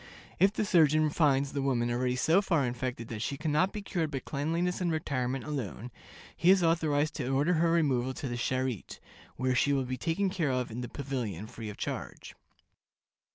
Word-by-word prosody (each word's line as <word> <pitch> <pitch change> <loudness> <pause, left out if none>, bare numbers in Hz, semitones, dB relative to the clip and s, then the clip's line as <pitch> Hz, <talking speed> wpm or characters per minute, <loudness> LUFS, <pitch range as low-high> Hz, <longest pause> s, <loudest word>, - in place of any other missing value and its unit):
If 195 +3 +5
the 215 - -1
surgeon 155 -4 +4
finds 140 -3 +2
the 140 - -1
woman 120 -3 +1
already 125 +1 0
so 160 +9 +3
far 165 -8 +1
infected 120 -1 -3
that 110 -2 -5
she 140 +4 -2
can 155 +1 -2
not 185 +6 +2
be 210 - -6
cured 170 -5 -1
by 140 - -3
cleanliness 165 +7 -2
and 175 -2 +1
retirement 135 -4 -2
alone, 125 -5 -5 0.4
he 170 - +2
is 190 -1 +6
authorized 155 -2 +2
to 135 -5 -3
order 140 +6 +2
her 165 0 +3
removal 130 -6 +1
to 135 - -4
the 120 - -4
Charité, 130 -2 -2 0.4
"where 130 +1 0
she 140 +3 +2
will 135 -2 +1
be 130 +1 -3
taken 175 +7 0
care 170 -6 0
of 125 -2 -1
in 120 +3 -5
the 120 - -5
pavilion 120 -10 -4
free 110 0 -8
of 105 - -8
charge." - - -5
140 Hz, 200 wpm, -30 LUFS, 125-165 Hz, 0.4 s, is